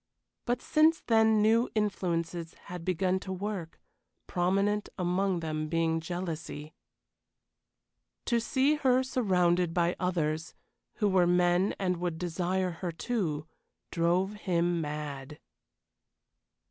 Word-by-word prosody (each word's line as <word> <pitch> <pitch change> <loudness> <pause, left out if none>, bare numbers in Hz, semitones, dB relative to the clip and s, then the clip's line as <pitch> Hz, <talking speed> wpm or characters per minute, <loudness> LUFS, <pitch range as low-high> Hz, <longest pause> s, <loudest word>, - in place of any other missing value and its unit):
But 245 +1 0
since 315 +1 +4
then 220 -2 +4
new 230 +3 +3
influences 170 -5 -1 0.2
had 175 -2 -6
begun 185 +1 +1
to 190 - -7
work 190 -3 -5 0.5
prominent 195 +3 0
among 180 0 0
them 155 -1 -3
being 165 0 +1
jealousy. 165 -3 -5 1.5
To 235 -2 +2
see 270 +5 +2
her 260 -3 +3
surrounded 180 -9 +1
by 175 0 +2
others 160 -4 -1 0.4
who 210 - +1
were 185 -3 +4
men 180 +2 +3
and 180 -2 0
would 175 -2 -2
desire 180 +2 -1
her, 180 -2 -2
too 165 -6 -2 0.5
drove 180 +4 +1
him 175 -4 0
mad. 150 -1 -5
180 Hz, 110 wpm, -30 LUFS, 165-205 Hz, 1.5 s, since